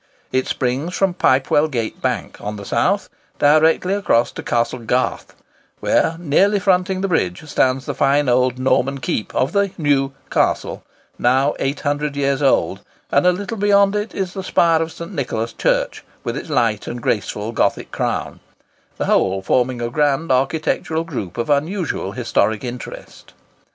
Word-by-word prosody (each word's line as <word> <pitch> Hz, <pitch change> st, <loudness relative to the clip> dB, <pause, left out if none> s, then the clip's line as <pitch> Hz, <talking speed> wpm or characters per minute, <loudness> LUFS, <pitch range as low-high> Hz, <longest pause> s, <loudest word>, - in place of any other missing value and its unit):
It 130 Hz, 0 st, 0 dB
springs 135 Hz, +8 st, -2 dB
from 195 Hz, -2 st, +2 dB
Pipewell 145 Hz, -2 st, +3 dB
Gate 120 Hz, -7 st, -4 dB
Bank, -, -, -2 dB
on 105 Hz, +1 st, -4 dB
the 100 Hz, -1 st, -8 dB
south, -, -, +1 dB, 0.3 s
directly 160 Hz, +5 st, +4 dB
across 160 Hz, -12 st, +2 dB
to -, -, -7 dB
Castle 120 Hz, +1 st, -1 dB
Garth, 125 Hz, +2 st, -1 dB, 0.4 s
where, 165 Hz, -, +2 dB
nearly 175 Hz, +6 st, +3 dB
fronting 185 Hz, -1 st, +1 dB
the 195 Hz, -, 0 dB
bridge, 95 Hz, -, -1 dB
stands 130 Hz, -2 st, +1 dB
the -, -, -3 dB
fine 140 Hz, +1 st, +2 dB
old 125 Hz, 0 st, +2 dB
Norman 135 Hz, +1 st, +1 dB
keep 115 Hz, -4 st, -3 dB
of 130 Hz, -, +1 dB
the 200 Hz, +1 st, +2 dB
New 140 Hz, -4 st, +1 dB, 0.2 s
Castle, -, -, 0 dB, 0.4 s
now 130 Hz, +4 st, +3 dB
nearly 135 Hz, -, +1 dB
800 145 Hz, 0 st, -2 dB
years 140 Hz, 0 st, 0 dB
old, 135 Hz, -, +2 dB, 0.3 s
and 145 Hz, +6 st, +3 dB
a -, -, +7 dB
little 205 Hz, +5 st, -4 dB
beyond 200 Hz, 0 st, +4 dB
it 210 Hz, +1 st, -3 dB
is 190 Hz, -2 st, -2 dB
the 190 Hz, -, -5 dB
spire 165 Hz, -3 st, +3 dB
of 165 Hz, 0 st, -2 dB
St. 170 Hz, +1 st, -8 dB
Nicholas 115 Hz, -4 st, -2 dB
Church, -, -, 0 dB, 0.2 s
with -, -, -3 dB
its -, -, -6 dB
light 105 Hz, -3 st, +1 dB
and 120 Hz, -, -4 dB
graceful 105 Hz, -1 st, -2 dB
Gothic 115 Hz, -, 0 dB
crown; -, -, -2 dB, 0.6 s
the -, -, -1 dB
whole 95 Hz, 0 st, +1 dB
forming 125 Hz, +2 st, +1 dB
a 120 Hz, -, -2 dB
grand 145 Hz, +2 st, +1 dB
architectural 160 Hz, +4 st, 0 dB
group 125 Hz, -, -6 dB
of 120 Hz, +4 st, -1 dB
unusual 160 Hz, +5 st, -1 dB
historic 110 Hz, +2 st, 0 dB
interest. 125 Hz, 0 st, -8 dB
140 Hz, 160 wpm, -20 LUFS, 125-170 Hz, 0.6 s, a